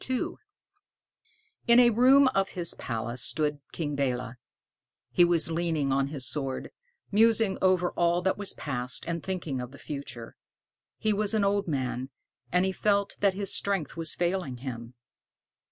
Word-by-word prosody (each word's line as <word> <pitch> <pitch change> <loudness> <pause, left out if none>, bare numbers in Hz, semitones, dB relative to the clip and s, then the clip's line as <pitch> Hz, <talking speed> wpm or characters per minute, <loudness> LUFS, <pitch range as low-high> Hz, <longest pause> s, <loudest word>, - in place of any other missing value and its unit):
II 255 -1 -1 1.4
In 235 +1 +7
a 240 -1 +6
room 260 +4 +6
of 195 -5 0
his 170 -2 +1
palace 120 +1 -4
stood 150 +1 0
King 150 -3 -3
Belé. 125 -3 -1 0.8
He 175 - +5
was 170 -2 +3
leaning 160 -4 0
on 135 0 +1
his 140 -3 -4
sword, 135 -3 -3 0.4
musing 220 -1 +3
over 185 -1 +3
all 175 +1 +1
that 190 - +2
was 205 -1 -2
past, 125 -3 -4
and 170 -1 -2
thinking 165 -9 -3
of 125 - -6
the 140 - -13
future. 130 -6 -7 0.6
He 215 -1 +1
was 210 +1 0
an 210 - +2
old 200 0 +1
man, 130 -3 -2 0.4
and 180 +1 +3
he 190 - 0
felt 200 +1 0
that 200 -2 +2
his 200 -1 0
strength 195 -8 0
was 165 -1 -1
failing 175 -7 -1
him. 120 -1 -6
170 Hz, 155 wpm, -28 LUFS, 135-200 Hz, 1.4 s, In